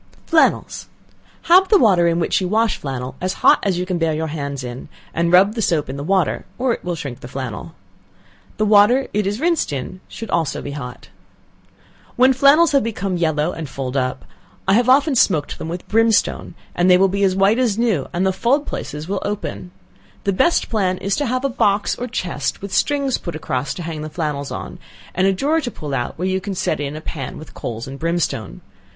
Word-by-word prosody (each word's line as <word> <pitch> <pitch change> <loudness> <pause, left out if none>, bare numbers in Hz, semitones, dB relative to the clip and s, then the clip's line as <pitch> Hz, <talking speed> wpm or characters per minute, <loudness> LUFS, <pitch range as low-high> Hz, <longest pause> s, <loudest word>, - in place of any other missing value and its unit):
Flannels. 325 -1 +1 0.6
Have 370 +3 +6
the 420 - +6
water 185 - +4
in 170 0 +1
which 170 - +1
you 185 - -1
wash 220 +3 +1
flannel 130 -2 -5
as 185 +1 -1
hot - - +7
as 195 -4 0
you 180 - -1
can 180 -2 -2
bear 160 -2 +1
your 160 +1 -2
hands 140 -3 -4
in, 125 +1 -7 0.2
and 170 +1 0
rub 190 +4 +5
the 225 - -3
soap 155 -8 0
in - - -6
the 140 - -5
water, 185 0 +1
or 255 -1 +1
it - - -7
will 175 -1 -2
shrink 140 -6 -6
the - - -9
flannel. 130 -2 -6 0.8
The 215 - +1
water 215 +6 +5
it 210 -1 0
is 205 +3 -2
rinsed 335 - +1
in 145 +7 -5
should 225 - -8
also 165 -3 0
be 145 - -6
hot. 125 -4 -8 1.1
When 255 +2 +5
flannels 280 +5 +5
have 280 -2 +4
become 200 -4 -2
yellow 160 -1 0
and 160 -5 -6
fulled 135 -1 -5
up, 130 -1 -1 0.4
I 190 - +4
have 240 +4 +3
often 280 +3 +5
smoked 160 - +2
them 160 - -5
with 175 +2 -6
brimstone, 225 0 +1 0.2
and 175 +1 +2
they 180 - +7
will 195 +1 +4
be 200 +1 -2
as 190 -2 +3
white 195 +5 +3
as 230 -5 +1
new, 220 - +1
and 175 +2 0
the 190 - +2
fulled 275 +9 +1
places 150 +2 -6
will 195 0 -2
open. 205 -3 -4 0.5
The 200 - +1
best 340 - +2
plan 190 -5 0
is 195 +1 -1
to 290 - 0
have 255 +3 -1
a - - +4
box 205 -6 +1
or 250 - -5
chest, 170 - -3
with 200 -1 -6
strings 280 +2 +1
put 170 - -6
across 130 -3 -3
to 175 - -6
hang 160 -2 -5
the 155 - -5
flannels 150 -3 -3
on, - - -7 0.3
and 185 +2 +2
a - - +4
drawer 290 - +1
to 260 - -3
pull 150 -10 -7
out 120 -2 -2
where 180 +3 -1
you 190 0 0
can 200 0 -4
set 190 - -1
in 145 0 -4
a 155 - -6
pan 140 -5 -6
with 155 - -11
coals 115 +1 -6
and 135 +1 -8
brimstone. 165 - -2
185 Hz, 220 wpm, -20 LUFS, 150-225 Hz, 1.1 s, hot